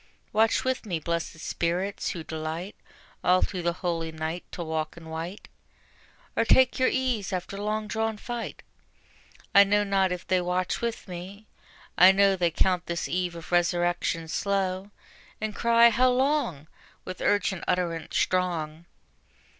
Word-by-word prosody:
Watch 220 Hz, +1 st, +3 dB
with 260 Hz, 0 st, -1 dB
me, 185 Hz, -7 st, -2 dB
blessed 170 Hz, +1 st, -3 dB
spirits, 175 Hz, +5 st, -2 dB
who 170 Hz, -5 st, -5 dB
delight 160 Hz, +5 st, -5 dB, 0.5 s
All 180 Hz, +1 st, +4 dB
through 185 Hz, -3 st, -2 dB
the 170 Hz, 0 st, 0 dB
holy 165 Hz, -2 st, -1 dB
night 160 Hz, +2 st, -4 dB
to 175 Hz, -, -5 dB
walk 160 Hz, 0 st, -3 dB
in 165 Hz, -1 st, -11 dB
white, 165 Hz, +5 st, -6 dB, 0.9 s
Or -, -, +3 dB
take 255 Hz, +3 st, +4 dB
your 255 Hz, -, +4 dB
ease 250 Hz, -7 st, -1 dB
after 185 Hz, +1 st, -4 dB
the 200 Hz, -, -5 dB
long 215 Hz, +1 st, -1 dB
drawn 220 Hz, 0 st, -1 dB
fight. 240 Hz, +2 st, -6 dB, 0.9 s
I 200 Hz, -, +9 dB
know 205 Hz, +1 st, +2 dB
not 195 Hz, -2 st, +2 dB
if 180 Hz, 0 st, -4 dB
they 185 Hz, -1 st, +2 dB
watch 180 Hz, +1 st, -1 dB
with 235 Hz, -2 st, -3 dB
me: 190 Hz, +4 st, -8 dB, 0.5 s
I 185 Hz, +2 st, +10 dB
know 195 Hz, 0 st, +4 dB
They 175 Hz, -2 st, +2 dB
count 180 Hz, +1 st, +1 dB
this 170 Hz, 0 st, -2 dB
eve 180 Hz, -1 st, -1 dB
of 165 Hz, 0 st, -10 dB
resurrection 175 Hz, -1 st, +1 dB
slow, 195 Hz, +2 st, -1 dB, 0.5 s
And 215 Hz, 0 st, -3 dB
cry, 235 Hz, 0 st, +5 dB
"How 255 Hz, +3 st, +4 dB
long?" 255 Hz, -, +1 dB, 0.4 s
with 185 Hz, -, -7 dB
urgent 200 Hz, -3 st, +1 dB
utterance 170 Hz, -3 st, -1 dB
strong. 170 Hz, -3 st, 0 dB
185 Hz, 155 wpm, -27 LUFS, 170-210 Hz, 0.9 s, I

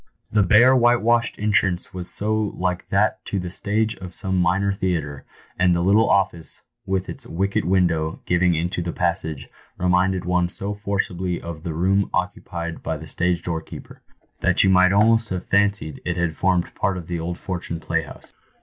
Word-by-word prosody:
The 105 Hz, -, +3 dB
bare 115 Hz, +7 st, +6 dB
whitewashed 120 Hz, -1 st, +3 dB
entrance 100 Hz, -4 st, 0 dB
was 90 Hz, -1 st, -6 dB
so 110 Hz, 0 st, -1 dB
like 90 Hz, 0 st, -2 dB
that 100 Hz, +2 st, +1 dB
to 100 Hz, -, -3 dB
the 90 Hz, -2 st, -4 dB
stage 110 Hz, +4 st, -1 dB
of 90 Hz, -2 st, -9 dB
some 95 Hz, -1 st, -3 dB
minor 95 Hz, +3 st, +2 dB
theatre, 80 Hz, -7 st, -3 dB, 0.3 s
and 90 Hz, -1 st, +4 dB
the 85 Hz, -, 0 dB
little 100 Hz, +3 st, +4 dB
office, 90 Hz, -5 st, 0 dB, 0.2 s
with 95 Hz, -1 st, -1 dB
its 130 Hz, -3 st, -7 dB
wicket 95 Hz, 0 st, -1 dB
window 85 Hz, -3 st, +1 dB
giving 90 Hz, 0 st, +2 dB
into 85 Hz, +2 st, -2 dB
the 85 Hz, 0 st, -4 dB
passage, 85 Hz, -4 st, -2 dB, 0.3 s
reminded 90 Hz, 0 st, +1 dB
one 90 Hz, -1 st, +1 dB
so 100 Hz, +3 st, -4 dB
forcibly 95 Hz, -3 st, -2 dB
of 85 Hz, -2 st, -7 dB
the 85 Hz, -2 st, -5 dB
room 95 Hz, +4 st, +2 dB
occu 90 Hz, +2 st, -2 dB
pied 85 Hz, -2 st, -5 dB
by 80 Hz, -, -3 dB
the 80 Hz, +1 st, -10 dB
stage 90 Hz, +3 st, -1 dB
door 80 Hz, -2 st, -2 dB
keeper, -, -, -11 dB, 0.4 s
that -, -, +2 dB
you 95 Hz, -, +4 dB
might 95 Hz, 0 st, +5 dB
almost 115 Hz, +3 st, +3 dB
have 90 Hz, -1 st, -4 dB
fancied 100 Hz, -6 st, +1 dB
it 85 Hz, 0 st, -2 dB
had 85 Hz, -2 st, -1 dB
formed 90 Hz, -2 st, +1 dB
part 95 Hz, -2 st, -1 dB
of 90 Hz, -, -7 dB
the 85 Hz, 0 st, -4 dB
old 85 Hz, +2 st, -4 dB
Fortune 85 Hz, -3 st, -5 dB
Playhouse. 75 Hz, -, -4 dB
90 Hz, 180 wpm, -22 LUFS, 85-100 Hz, 0.4 s, bare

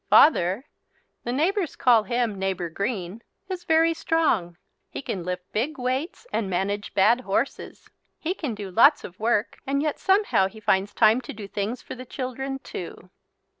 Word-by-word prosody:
Father 205 Hz, -, +5 dB, 0.6 s
the 240 Hz, -, -1 dB
neighbours 335 Hz, +6 st, 0 dB
call 240 Hz, -4 st, +5 dB
him 235 Hz, -3 st, -1 dB
Neighbour 190 Hz, -3 st, -2 dB
Green 200 Hz, +1 st, -3 dB, 0.3 s
is 360 Hz, -2 st, -5 dB
very 325 Hz, +1 st, +4 dB
strong. 305 Hz, -, 0 dB, 0.3 s
He -, -, -6 dB
can 185 Hz, -8 st, -3 dB
lift 180 Hz, +1 st, -5 dB
big 265 Hz, +9 st, -1 dB
weights 260 Hz, -, -2 dB
and 205 Hz, -4 st, 0 dB
manage 195 Hz, +3 st, -2 dB
bad 230 Hz, +6 st, +4 dB
horses. 235 Hz, +4 st, -3 dB, 0.3 s
He 340 Hz, +3 st, -2 dB
can 295 Hz, -, -4 dB
do 200 Hz, -2 st, -7 dB
lots 280 Hz, -, +6 dB
of 180 Hz, -, -10 dB
work 220 Hz, -1 st, 0 dB
and 280 Hz, +1 st, +1 dB
yet 305 Hz, -2 st, -1 dB
somehow 385 Hz, -, +3 dB
he 220 Hz, +3 st, -12 dB
finds 200 Hz, -1 st, +1 dB
time 225 Hz, +2 st, +5 dB
to -, -, -8 dB
do 210 Hz, -2 st, -8 dB
things 205 Hz, +5 st, -3 dB
for -, -, -7 dB
the 255 Hz, -, -8 dB
children 265 Hz, +1 st, -4 dB
too. -, -, -8 dB
230 Hz, 170 wpm, -25 LUFS, 195-280 Hz, 0.6 s, lots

